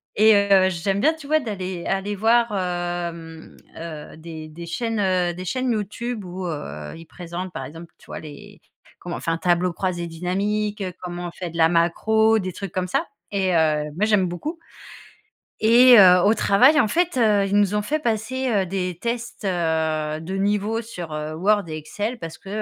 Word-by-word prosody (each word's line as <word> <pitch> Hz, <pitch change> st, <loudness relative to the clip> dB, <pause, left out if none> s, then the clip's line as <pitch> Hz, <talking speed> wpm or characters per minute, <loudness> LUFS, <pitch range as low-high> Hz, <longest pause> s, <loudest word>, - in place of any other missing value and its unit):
et 220 Hz, +1 st, +6 dB
heu, 195 Hz, -2 st, +4 dB
j'aime 190 Hz, +2 st, -1 dB
bien, 315 Hz, +6 st, +4 dB
tu 315 Hz, -3 st, -12 dB
vois? 310 Hz, +1 st, +3 dB
D'aller 190 Hz, -, -5 dB
aller 195 Hz, +2 st, -1 dB
voir, 230 Hz, +3 st, +3 dB
hem, 175 Hz, -3 st, -4 dB, 0.2 s
heu, 160 Hz, -2 st, -8 dB
des 160 Hz, -1 st, -9 dB
des 170 Hz, +2 st, -9 dB
chaînes, 225 Hz, +6 st, -2 dB
heu, 185 Hz, -3 st, +1 dB
des 180 Hz, +2 st, -7 dB
chaînes 255 Hz, +6 st, -1 dB
YouTube 220 Hz, +2 st, -3 dB
où, 180 Hz, +1 st, -6 dB
heu, 75 Hz, -, -6 dB
ils 165 Hz, -, -12 dB
présentent, 175 Hz, +2 st, -7 dB
par 135 Hz, -, -5 dB
exemple, 165 Hz, +4 st, -11 dB
tu -, -, -21 dB
vois? -, -, -6 dB
Les 205 Hz, +7 st, -12 dB, 0.4 s
comment 175 Hz, -1 st, -5 dB
on -, -, -7 dB
fait 165 Hz, -, -2 dB
un 165 Hz, -, 0 dB
tableau 175 Hz, +1 st, +1 dB
croisé 175 Hz, -1 st, -3 dB
dynamique, 200 Hz, +5 st, -2 dB, 0.2 s
comment 175 Hz, -1 st, -5 dB
on 170 Hz, -, -7 dB
fait 175 Hz, -1 st, -6 dB
de 165 Hz, -, -8 dB
la 160 Hz, -1 st, +5 dB
macro, 220 Hz, +6 st, +3 dB
des 185 Hz, -2 st, -4 dB
trucs 195 Hz, 0 st, -6 dB
comme 185 Hz, 0 st, -2 dB
ça 325 Hz, -, -1 dB, 0.2 s
et 190 Hz, -2 st, 0 dB
heu, 155 Hz, -2 st, +2 dB
moi, 205 Hz, -, +1 dB
j'aime 205 Hz, -4 st, +3 dB
beaucoup 295 Hz, -, -5 dB, 1.1 s
et 240 Hz, +3 st, +7 dB
heu, 180 Hz, -2 st, +8 dB
au 210 Hz, -, +5 dB
travail, 250 Hz, +8 st, +5 dB
en 230 Hz, -, +4 dB
fait, 345 Hz, +2 st, 0 dB
heu, 210 Hz, -4 st, +3 dB
ils 200 Hz, +1 st, +1 dB
nous 205 Hz, 0 st, +2 dB
ont 210 Hz, -, +1 dB
fait 305 Hz, +9 st, -1 dB
passer, 255 Hz, +1 st, -2 dB
heu, 200 Hz, -5 st, +1 dB
des 180 Hz, -1 st, -3 dB
tests, 235 Hz, 0 st, -4 dB
heu, 160 Hz, -4 st, -1 dB
de 185 Hz, +4 st, -5 dB
niveau 210 Hz, +3 st, 0 dB
sur, 180 Hz, -8 st, -8 dB
heu, 155 Hz, 0 st, -4 dB
Word 200 Hz, +5 st, +2 dB
et 155 Hz, -, -5 dB
Excel 205 Hz, +10 st, -4 dB
parce 165 Hz, -6 st, -8 dB
que, -, -, -18 dB
185 Hz, 195 wpm, -23 LUFS, 170-215 Hz, 1.1 s, heu